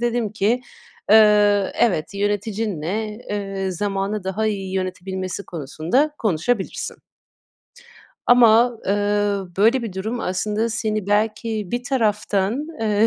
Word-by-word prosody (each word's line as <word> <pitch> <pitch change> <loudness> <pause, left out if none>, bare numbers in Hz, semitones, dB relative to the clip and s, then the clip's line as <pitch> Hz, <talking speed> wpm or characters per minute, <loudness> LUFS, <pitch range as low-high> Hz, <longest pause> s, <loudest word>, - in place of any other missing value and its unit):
dedim 235 -3 -1
ki, 220 +4 +1 0.5
"Eee, 210 -2 +5
evet. 190 -6 +1
Yöneticinle, 205 -1 -2 0.2
eee, 195 -2 -3
zamanı 195 +2 -2
daha 195 +3 -1
iyi 195 -3 -3
yönetebilmesi 185 +1 -4
konusunda 170 - -1
konuşabilirsin." 210 +2 -1 1.3
Ama, 240 -1 +5
eee, 195 - +2 0.6
böyle 230 +6 +4
bir 225 -4 -5
durum 220 +6 -3
aslında 210 +4 -1
seni 215 -2 -2
belki 215 0 0
bir 240 +1 -2
taraftan, 215 0 0
eee, 215 0 +3
210 Hz, 105 wpm, -21 LUFS, 195-225 Hz, 1.3 s, Eee